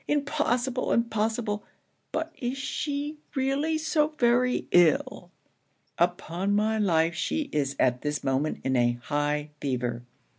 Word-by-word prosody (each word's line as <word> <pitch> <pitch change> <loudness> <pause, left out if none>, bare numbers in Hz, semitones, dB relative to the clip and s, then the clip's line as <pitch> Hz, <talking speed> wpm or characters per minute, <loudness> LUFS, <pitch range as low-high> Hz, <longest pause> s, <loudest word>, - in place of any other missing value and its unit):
Impossible! 275 -4 0
impossible! 220 -2 0 0.5
but 320 0 -3
is 250 +2 -2
she 290 +2 -3 0.2
really 275 +4 +1
so 310 -1 +2
very 245 0 +2
ill?' 175 -4 +3 0.7
'Upon 175 +2 0
my 220 +1 +1
life 170 -4 +2
she 285 - -2
is 140 -2 0
at 125 -1 +2
this 150 0 -2
moment 135 +3 0
in 130 0 0
a 120 -1 +3
high 145 +4 -2
fever. 125 -3 -2
210 Hz, 120 wpm, -27 LUFS, -, 0.7 s, ill